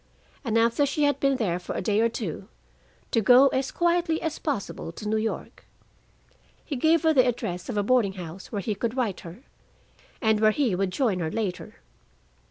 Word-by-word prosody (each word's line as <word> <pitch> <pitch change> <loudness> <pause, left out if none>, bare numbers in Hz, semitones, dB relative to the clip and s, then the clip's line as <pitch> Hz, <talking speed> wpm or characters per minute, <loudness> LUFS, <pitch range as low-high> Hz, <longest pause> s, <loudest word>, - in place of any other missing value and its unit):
And 230 -4 0
after 230 +4 +3
she 285 +2 0
had 285 -1 +2
been 275 -1 +2
there 190 -9 -1
for 180 - -6
a - - -2
day 210 +2 +2
or 230 - +3
two, 210 -8 -5 0.6
to 225 - +2
go 255 +5 +7
as 260 0 -1
quietly 345 -1 +1
as 320 -2 -4
possible 255 - -4
to 210 +5 -8
New 215 - 0
York. 220 0 -4 1.0
He 290 - -4
gave 320 +5 +3
her 320 -1 +4
the 255 -3 +4
address 180 -7 -3
of 225 - -3
a 205 - +2
boarding 225 -3 +2
house 180 0 -9
where 205 -4 -3
he 215 - -1
could 230 +4 -3
write 225 -7 -1
her, 180 +4 -11 0.8
and 220 -3 +2
where 215 0 +5
he 240 -1 +1
would 190 +1 0
join 210 -2 0
her 160 -2 -2
later. 180 -4 -4
225 Hz, 195 wpm, -26 LUFS, 195-270 Hz, 1.0 s, go